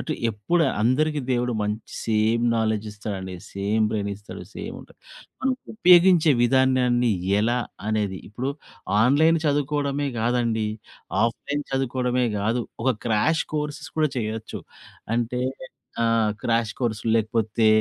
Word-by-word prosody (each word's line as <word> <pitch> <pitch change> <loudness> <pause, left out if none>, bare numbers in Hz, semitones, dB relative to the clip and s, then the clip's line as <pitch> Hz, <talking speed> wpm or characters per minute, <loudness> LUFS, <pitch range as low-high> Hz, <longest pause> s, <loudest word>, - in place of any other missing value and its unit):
అంటె 155 - -3 0.2
ఎప్పుడు 115 +11 +1 0.2
అందరికీ 150 +6 +2
దేవుడు 125 0 +1
మంచి 105 +2 -4
సేమ్ 110 +1 +2
నాలెడ్జ్ 110 -1 0
ఇస్తాడండి. 100 -3 -6 0.2
సేమ్ 105 +3 +1
బ్రెయిన్ 105 -2 -2
ఇస్తాడు, 100 +1 -10
సేమ్ - - -6
ఉంటది. - - -18 0.4
మనం 265 0 +1 0.2
ఉపయోగించే 180 -5 +6
విధానాన్ని 125 -1 +3 0.3
ఎలా 120 +3 +1 0.3
అనేది 105 -3 -1
ఇప్పుడు 125 +6 -3 0.5
ఆన్‌లైన్ 155 +7 +4
చదువుకోవడమే 145 0 0
కాదండి. 115 -2 +1 0.6
ఆఫ్‌లైన్ 140 +5 -1
చదువుకోవడమే 125 -1 0
కాదు. 115 +4 0 0.2
ఒక 130 - +4 0.2
క్రాష్ 115 +9 +2
కోర్సెస్ 150 -1 -3
కూడా 155 -2 +3
చేయొచ్చు. 110 -1 -4 0.5
అంటే 120 +1 -1 0.6
ఆ! - - +3 0.4
క్రాష్ 115 -1 +1
కోర్స్ 115 -4 -1
లేకపోతే. 110 0 +1
120 Hz, 120 wpm, -24 LUFS, 110-140 Hz, 0.6 s, ఉపయోగించే